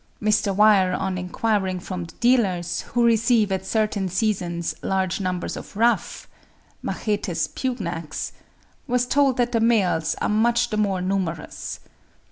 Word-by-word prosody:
Mr. 210 -1 +2
Weir 200 -3 +5
on 190 0 -1
enquiring 185 +1 -1
from 180 -1 -5
the 165 - -13
dealers, 200 -9 +2
who 240 -1 +4
receive 230 -2 +3
at 190 0 -2
certain 210 -3 0
seasons 180 -4 -1
large 190 0 -1
numbers 185 -1 -2
of - - -9
ruffs 235 +2 +1 0.6
(Machetes 205 -5 -2
pugnax), 175 - -4 0.6
was 250 -1 +1
told 275 0 +2
that 245 -1 +1
the 230 - +2
males 190 -9 +2
are - - 0
much 235 +3 +2
the 215 - -1
more 195 -3 +1
numerous. 185 -4 -3
200 Hz, 135 wpm, -23 LUFS, 180-230 Hz, 0.6 s, Weir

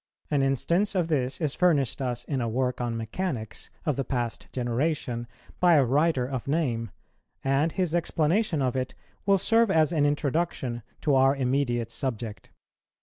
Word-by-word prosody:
An 145 -2 +3
instance 170 - +1
of 175 -3 +1
this 135 -4 0
is 150 -4 0
furnished 150 -9 +2
us 125 -2 -2
in 135 -4 -2
a 115 - -1
work 125 +2 -1
on 120 -1 -2
Mechanics 115 - -4 0.2
of 150 -5 0
the 135 - 0
past 120 -2 -3
generation, 120 -1 -1 0.3
by 175 -2 +5
a 140 -3 +5
writer 140 +1 +2
of 130 -1 -4
name, 130 -7 0 0.5
and 135 +4 +2
his 180 -4 0
explanation 170 0 +1
of 125 -1 0
it 130 -1 -2 0.3
will 200 0 +5
serve 225 +3 +3
as 160 -3 +3
an 145 -3 +3
introduction 145 -4 -1 0.2
to 150 - +2
our 135 +1 +5
immediate 125 -3 0
subject. 115 -3 -4
135 Hz, 160 wpm, -27 LUFS, 125-160 Hz, 0.5 s, by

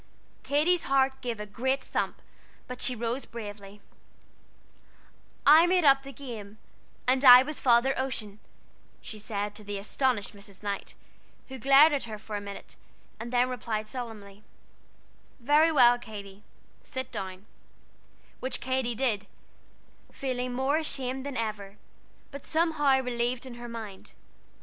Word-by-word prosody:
Katy's 320 +5 +2
heart 265 0 +2
gave 235 -3 -4
a 210 - -4
great 260 +6 -1
thump, - - -3 0.4
but 250 0 -7
she 255 - +2
rose 235 +3 -3
bravely: 205 -3 -9 1.6
"I 315 +4 +8
made 360 -2 +2
up 275 -1 +6
the 275 0 -10
game, 225 -7 -9 0.5
and 255 +2 +2
I 250 -1 +10
was 300 +2 -6
Father 245 +1 +4
Ocean," 220 -6 -4 0.6
she 215 - -9
said 205 -1 -3
to 210 - -11
the 205 0 -5
astonished 215 +1 -1
Mrs. 200 -1 -15
Knight, 200 -1 -4 0.5
who 265 0 -8
glared 275 +5 +7
at 280 - -1
her 220 -2 -7
for 210 0 -7
a 205 - -3
minute, 200 0 -9 0.4
and 235 +1 -6
then 250 0 +3
replied 220 -3 -3
solemnly: 215 -5 -8 1.0
"Very 295 +6 +4
well, 245 -5 +6
Katy 205 -4 -10 0.4
sit 260 0 -6
down;" 190 +1 -6 0.9
which 260 - -3
Katy 260 -2 -1
did, 220 -5 -1 0.8
feeling 255 -2 -3
more 265 +4 +1
ashamed 265 -3 -3
than 280 - -5
ever, 210 -3 -4 0.5
but 280 0 -9
somehow 315 -5 +2
relieved 245 0 -2
in 255 - -8
her 240 0 -9
mind. 220 -4 -9
245 Hz, 140 wpm, -28 LUFS, 210-270 Hz, 1.6 s, I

